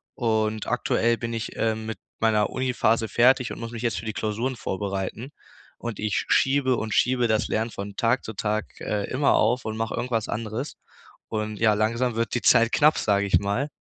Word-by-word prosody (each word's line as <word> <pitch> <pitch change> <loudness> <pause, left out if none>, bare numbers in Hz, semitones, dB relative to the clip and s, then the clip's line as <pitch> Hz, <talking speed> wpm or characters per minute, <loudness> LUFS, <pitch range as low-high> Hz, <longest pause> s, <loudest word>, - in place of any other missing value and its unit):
Und 110 -2 0
aktuell 115 0 +1
bin 115 0 -4
ich, 115 -1 -4
ähm, 110 -1 -1
mit 110 - -4 0.2
meiner 110 -2 +2
Uni-Phase 120 -3 +1
fertig 125 +3 +3
und - - -7
muss 115 0 -6
mich 115 - -6
jetzt 115 -3 0
für - - -9
die 110 - -3
Klausuren 110 +5 -2
vorbereiten. 100 +4 -4 0.5
Und 120 -3 -5
ich 105 -1 -1
schiebe 135 -2 +3
und 110 -1 -3
schiebe 125 -1 +2
das 110 -1 +1
Lernen 110 +2 -1
von 100 -1 -7
Tag 120 +2 +1
zu - - -5
Tag, 105 +2 -3
äh, 105 -1 -2
immer 140 +2 +2
auf 120 +4 +2
und 110 - -3
mach 115 0 -2
irgendwas 115 -3 -2
anderes. 115 +4 -4 0.5
Und 110 -1 -3
ja, 110 -2 +4
langsam 115 +3 0
wird 115 0 -1
die 120 - -1
Zeit 115 0 +5
knapp, 150 +1 +4
sag 100 -1 +2
ich 100 - +3
mal. 100 +8 -1
115 Hz, 195 wpm, -25 LUFS, 110-120 Hz, 0.5 s, Zeit